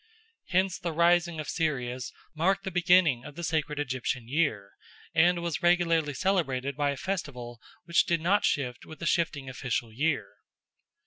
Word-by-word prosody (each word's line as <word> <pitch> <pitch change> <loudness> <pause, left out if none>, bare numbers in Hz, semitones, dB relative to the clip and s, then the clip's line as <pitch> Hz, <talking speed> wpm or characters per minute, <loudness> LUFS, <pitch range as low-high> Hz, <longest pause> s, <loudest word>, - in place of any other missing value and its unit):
Hence 185 0 +1
the 170 -2 -3
rising 170 0 +3
of 155 - -5
Sirius 130 -6 -2 0.2
marked 190 +5 +1
the 190 - -4
beginning 175 -7 +4
of 150 -1 -10
the 170 - -6
sacred 155 -3 -1
Egyptian 130 -3 -2
year, 120 -9 0 0.4
and 170 +1 +3
was 170 -2 -2
regularly 165 -4 +2
celebrated 140 -7 0
by 145 0 +1
a 140 - -2
festival 125 -11 -5 0.2
which 170 -1 +3
did 170 -1 +2
not 190 +6 +2
shift 125 -4 -1
with 155 - -11
the 170 - -6
shifting 165 -6 0
official 125 -3 -3
year. 145 +4 -1
155 Hz, 155 wpm, -28 LUFS, 130-175 Hz, 0.4 s, beginning